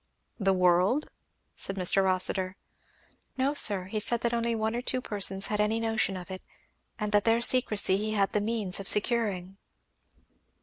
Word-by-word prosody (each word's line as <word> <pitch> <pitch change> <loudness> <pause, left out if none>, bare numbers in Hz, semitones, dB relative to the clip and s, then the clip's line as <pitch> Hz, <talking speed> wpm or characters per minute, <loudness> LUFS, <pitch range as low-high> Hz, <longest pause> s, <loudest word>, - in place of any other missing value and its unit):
"The 195 -2 +1
world?" 185 +9 +1 0.4
said 195 - -2
Mr. 195 +1 +3
Rossitur. 185 0 +2 0.8
"No 270 +2 0
sir, 205 -9 +3
he 200 +4 -4
said 235 +2 -2
that 235 0 -1
only 235 0 -1
one 220 +1 -2
or 240 - -3
two 255 0 -2
persons 195 -4 0
had 210 0 -1
any 215 +2 0
notion 225 -4 -1
of 180 +1 -10
it 185 - -7 0.6
and 210 -1 -4
that 205 -1 +2
their 230 0 +2
secrecy 220 -6 +2
he 215 +1 -3
had 200 -2 0
the 210 - +1
means 210 -4 -2
of 195 - -7
securing." 205 -4 0
210 Hz, 170 wpm, -27 LUFS, 190-230 Hz, 0.8 s, Mr